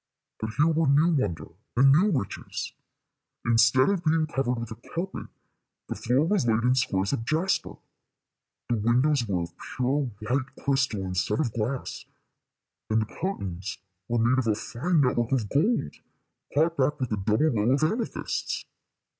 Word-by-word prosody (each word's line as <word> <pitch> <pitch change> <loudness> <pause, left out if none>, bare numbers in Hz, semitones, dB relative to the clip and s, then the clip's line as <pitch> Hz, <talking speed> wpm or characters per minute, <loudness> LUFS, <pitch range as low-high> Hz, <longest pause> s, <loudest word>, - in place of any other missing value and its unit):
But 110 - -3
here 150 - +5
were 165 -1 +2
new 150 +5 +4
wonder 85 - -1 0.3
and 135 +2 +7
new 180 +9 +5
riches. 130 - -3 0.7
Instead 115 +2 +5
of 190 -4 -1
being 160 -1 +2
covered 135 -5 -1
with 115 0 -6
a 110 +1 -11
carpet, 185 +3 -4 0.6
the - - -1
floor 125 +6 +1
was 180 -7 +1
laid 115 0 +2
in 125 +1 +4
squares 100 -6 0
of 115 - -1
jasper, 160 +9 0 0.9
the 120 - 0
windows 120 +4 +2
were 90 -4 0
of 85 0 -8
pure 130 +1 -1
white 130 +5 -2
crystal 135 -7 0
instead 95 +3 -1
of 125 -8 0
glass, 120 +4 -3 0.8
and 110 0 +2
the 110 - -12
curtains 95 - -3 0.3
were 120 - 0
made 120 +3 +3
of 125 - -1
a 110 - +3
fine 150 +9 0
net 125 -3 +2
work 120 +1 0
of 120 -6 +1
gold, 155 - +1 0.6
caught 160 +3 +2
back 140 +2 +1
with 130 -3 -2
a 105 - 0
double 110 +10 +2
row 110 -1 +1
of 135 +3 +2
amethysts. 220 +9 -2
130 Hz, 165 wpm, -27 LUFS, 110-150 Hz, 0.9 s, and